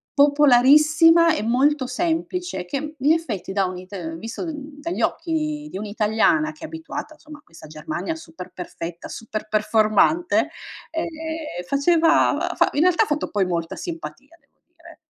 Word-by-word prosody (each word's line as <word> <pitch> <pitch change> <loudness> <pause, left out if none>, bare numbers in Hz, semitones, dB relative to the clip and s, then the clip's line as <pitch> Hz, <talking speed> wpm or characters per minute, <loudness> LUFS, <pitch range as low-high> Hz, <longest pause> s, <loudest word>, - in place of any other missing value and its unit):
popolarissima, 300 +4 +5
e 215 - -3
molto 260 +4 +2
semplice, 335 - -2
che, 295 - -5
in 285 +4 +2
effetti, 255 - -3
da 195 0 +1
un 185 0 -5
ita 180 -3 -7
visto, 225 - -6
mhmm, 295 -1 -8
dagli 335 +3 -3
occhi 305 -3 -2
di - - -6
un'italiana, 220 +9 +1
che 310 - -16
è - - -3
abituata, 320 -1 -7
somma, 300 -1 -12
a - - -20
questa 165 -2 -14
Germania 310 - -5
super 320 - -10
perfetta, 170 -1 -7
super 215 -1 -6
performante, 215 - +2 0.4
ehm, 325 0 -2 0.6
faceva 325 +4 +3
fa - - +3
in 290 - 0
realtà, 365 +4 +4
ha - - -2
fatto, 300 -2 -2
poi, 200 -2 +1
molta 170 -2 -3
simpatia 330 -3 -8
devo - - -41
dire. 340 -1 -17
295 Hz, 155 wpm, -22 LUFS, 215-325 Hz, 0.6 s, popolarissima